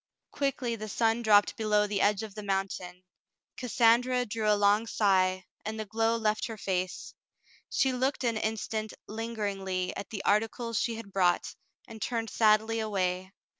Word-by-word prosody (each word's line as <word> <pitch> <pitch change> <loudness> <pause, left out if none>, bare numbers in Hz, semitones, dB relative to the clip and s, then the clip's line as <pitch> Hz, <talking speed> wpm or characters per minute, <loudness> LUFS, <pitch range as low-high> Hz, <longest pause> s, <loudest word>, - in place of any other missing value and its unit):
Quickly 270 -4 -1
the 215 -1 -7
sun 225 +2 +1
dropped 210 -3 +4
below 210 -1 +2
the 205 -1 -1
edge 205 +1 +2
of 215 -2 -7
the 210 - -7
moun 195 -1 0
tain. 180 0 -8 0.5
Cassandra 250 +1 +3
drew 215 -1 0
a 210 - +4
long 205 +2 +3
sigh, 185 -4 +2 0.2
and 220 +1 -4
the 215 - -3
glow 225 +2 +1
left 215 -1 0
her 225 -2 -7
face. 185 -2 -3 0.6
She 265 -1 +2
looked 260 +2 -1
an 235 -2 +1
instant 220 0 -3
lingeringly 200 -4 -3
at - - -6
the 205 -3 -6
articles 225 +2 +1
she 230 - -1
had 215 -3 -9
brought, 180 -2 +2 0.3
and 220 -1 -11
turned 230 -2 -2
sadly 220 +1 +3
away. 185 -3 -1
215 Hz, 165 wpm, -29 LUFS, 200-230 Hz, 0.6 s, dropped